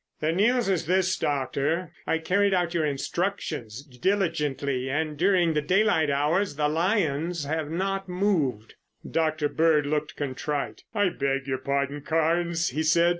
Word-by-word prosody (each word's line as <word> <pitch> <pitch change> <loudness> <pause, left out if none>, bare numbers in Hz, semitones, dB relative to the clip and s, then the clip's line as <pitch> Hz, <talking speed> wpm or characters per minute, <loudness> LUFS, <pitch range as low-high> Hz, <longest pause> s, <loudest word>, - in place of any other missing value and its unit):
"The 155 +1 +1
news 230 +7 +2
is 190 -5 0
this, 185 +1 +2
Doctor. 145 +4 -1 0.2
I - - +2
carried 195 +4 +2
out 175 -1 0
your 160 -3 +1
instructions 140 - -3
diligently 145 -3 -1
and, 155 +2 -1
during 175 0 +3
the 150 - +1
daylight 180 -1 +2
hours, 150 +5 +1
the 150 0 +1
lions 165 -1 0
have 155 0 -2
not 195 +3 -2
moved." 170 - 0 0.3
Dr. 155 -2 0
Bird 155 -1 +2
looked 150 +1 -2
contrite. 145 +1 -3
"I 205 -2 +3
beg 135 -4 -1
your 130 -1 -2
pardon, 140 +2 -1
Carnes," 165 +3 +1
he 150 +5 -2
said. 170 +2 +4
160 Hz, 145 wpm, -26 LUFS, 145-180 Hz, 0.3 s, said